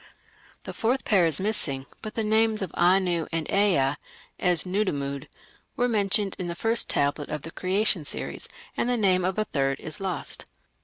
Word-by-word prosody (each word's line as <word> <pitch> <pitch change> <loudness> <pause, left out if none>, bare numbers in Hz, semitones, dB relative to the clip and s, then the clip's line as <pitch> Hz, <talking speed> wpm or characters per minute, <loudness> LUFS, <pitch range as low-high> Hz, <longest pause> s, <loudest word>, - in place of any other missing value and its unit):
The - - -7
fourth 245 +4 0
pair 185 -5 +4
is 155 -3 +2
missing, 155 -10 0 0.2
but 215 - -7
the 225 - 0
names 220 -1 +2
of 185 - -4
Anu 175 -2 +3
and 165 -2 -2
Ea 180 -10 +3 0.5
(as 180 -2 +2
Nudimmud) 145 -8 -2 0.5
are 245 - +2
mentioned 205 -3 +1
in 180 - -2
the 170 - -3
first 225 +4 +1
tablet 145 +1 0
of 150 -2 -4
the 165 - -7
Creation 190 -1 +1
series, 145 - -5 0.3
and 245 - 0
the 245 - +2
name 185 -4 +3
of 185 +2 -1
a 215 - +1
third 135 -6 0
is 155 - -5
lost. 190 -3 -3
185 Hz, 175 wpm, -26 LUFS, 155-215 Hz, 0.5 s, pair